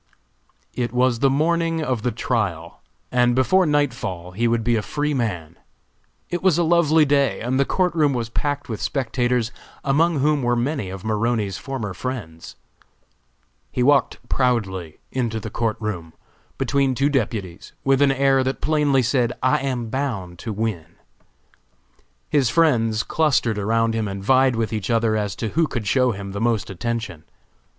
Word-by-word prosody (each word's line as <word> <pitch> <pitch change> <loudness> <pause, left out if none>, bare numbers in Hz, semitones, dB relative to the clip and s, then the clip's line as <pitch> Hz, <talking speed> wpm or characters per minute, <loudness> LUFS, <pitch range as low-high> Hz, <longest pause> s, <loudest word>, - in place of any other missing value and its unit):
It 120 -2 -2
was 125 -1 +2
the 135 - +4
morning 165 +3 +1
of 130 -6 -1
the 125 - 0
trial, 100 -9 -2 0.3
and 120 -1 +3
before 185 +8 +3
nightfall 120 - -1
he 115 +6 0
would 115 -1 +1
be 120 +1 +2
a 110 - +1
free 150 +6 -2
man. 90 - -3 0.7
It 175 - -2
was 185 -4 +3
a 175 - +3
lovely 160 -2 +4
day 140 -3 +2
and 125 +3 -1
the 140 - +3
court 180 +3 +1
room 150 -5 +2
was 115 -2 -2
packed 145 +4 -2
with 110 -3 -5
spectators, 125 -3 0 0.3
among 155 +4 +2
whom 150 +1 +2
were 120 -1 +1
many 125 -3 -1
of 95 +1 -8
Maroney's 110 -3 -1
former 115 -3 -4
friends. 90 -7 -6 1.2
He 125 - 0
walked 140 0 +3
proudly 95 - -1
into 115 -4 -1
the 110 0 -7
court 115 -1 -1
room, 90 -7 -5 0.4
between 135 -2 +1
two 140 +3 +2
deputies, 105 -10 -3
with 135 0 +3
an 140 -1 +5
air 135 0 +3
that 130 +1 -2
plainly 145 -3 +2
said, 120 0 +1
"I 130 - +3
am 125 -4 -3
bound 105 -10 -3
to 115 - -5
win!" 100 -7 -3 1.3
His 140 -5 +2
friends 115 -8 +2
clustered 130 -9 +1
around 115 +2 +1
him 110 -1 -1
and 100 0 -5
vied 130 +2 +4
with 115 -1 -1
each 105 -3 -3
other 115 -2 +2
as 105 -2 -2
to 110 - -3
who 165 +5 +1
could 120 -7 -4
show 125 +5 +3
him 100 -2 -6
the 100 +2 -5
most 115 -4 0
attention. 105 -4 -4
120 Hz, 165 wpm, -22 LUFS, 110-140 Hz, 1.3 s, an